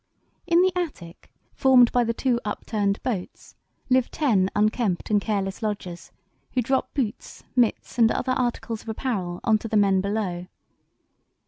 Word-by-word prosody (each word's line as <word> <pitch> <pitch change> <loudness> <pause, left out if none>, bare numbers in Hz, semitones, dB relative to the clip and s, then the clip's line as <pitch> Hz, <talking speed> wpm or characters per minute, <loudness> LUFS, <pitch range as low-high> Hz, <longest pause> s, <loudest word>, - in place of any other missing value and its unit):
"In 345 +1 +5
the 370 -1 +1
attic, 280 - -5 0.2
formed 255 -3 +5
by 245 - +3
the 230 - 0
two 240 +1 0
upturned 205 -1 -2
boats, 205 -8 -5 0.3
live 255 -1 +2
ten 210 -11 +1
unkempt 215 -2 0
and 205 -1 +3
careless 195 -3 -2
lodgers, 200 -5 -5 0.4
who 250 - +1
drop 265 +3 0
boots, 240 -7 -4
mitts, 245 0 0
and 225 -1 +6
other 255 - -1
articles 235 -3 -2
of - - -10
apparel 205 -7 -3
on 220 -1 +3
to 225 - -6
the 220 - +1
men 195 -2 +3
below. 195 -3 -3
220 Hz, 150 wpm, -24 LUFS, 200-250 Hz, 0.4 s, and